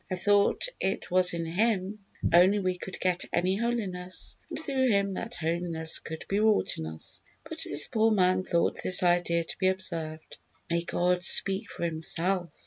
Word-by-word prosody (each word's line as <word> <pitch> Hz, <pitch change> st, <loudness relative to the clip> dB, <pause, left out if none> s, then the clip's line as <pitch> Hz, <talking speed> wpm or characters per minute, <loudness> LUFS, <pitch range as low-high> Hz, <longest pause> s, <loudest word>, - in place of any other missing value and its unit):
I 185 Hz, -, -1 dB
thought 200 Hz, +2 st, +2 dB
it 190 Hz, -2 st, -2 dB
was 180 Hz, 0 st, +3 dB
in 165 Hz, 0 st, -3 dB
Him 200 Hz, +3 st, 0 dB, 0.3 s
only 185 Hz, +4 st, +6 dB
we 185 Hz, -2 st, 0 dB
could 190 Hz, +1 st, -8 dB
get 180 Hz, -1 st, 0 dB
any 180 Hz, +2 st, +1 dB
holiness, 195 Hz, -6 st, -3 dB
and -, -, -3 dB
through 270 Hz, -4 st, +1 dB
Him 200 Hz, -3 st, +2 dB
that 230 Hz, +5 st, -5 dB
holiness 165 Hz, -1 st, -2 dB
could 160 Hz, 0 st, -8 dB
be 200 Hz, -, 0 dB
wrought 215 Hz, -1 st, +2 dB
in 80 Hz, -, -4 dB
us." 80 Hz, 0 st, -8 dB, 0.3 s
But -, -, -8 dB
this 145 Hz, +1 st, +3 dB
poor 220 Hz, 0 st, +2 dB
man 185 Hz, -3 st, +3 dB
thought 170 Hz, -2 st, 0 dB
this 185 Hz, 0 st, +2 dB
idea 175 Hz, -1 st, +2 dB
to 165 Hz, -, -6 dB
be 185 Hz, -, +2 dB
absurd. 165 Hz, -4 st, -2 dB, 0.5 s
May 170 Hz, 0 st, +2 dB
God 180 Hz, +1 st, 0 dB
speak 195 Hz, +5 st, +2 dB
for -, -, -6 dB
Himself! 170 Hz, +2 st, -1 dB
185 Hz, 175 wpm, -28 LUFS, 170-200 Hz, 0.5 s, only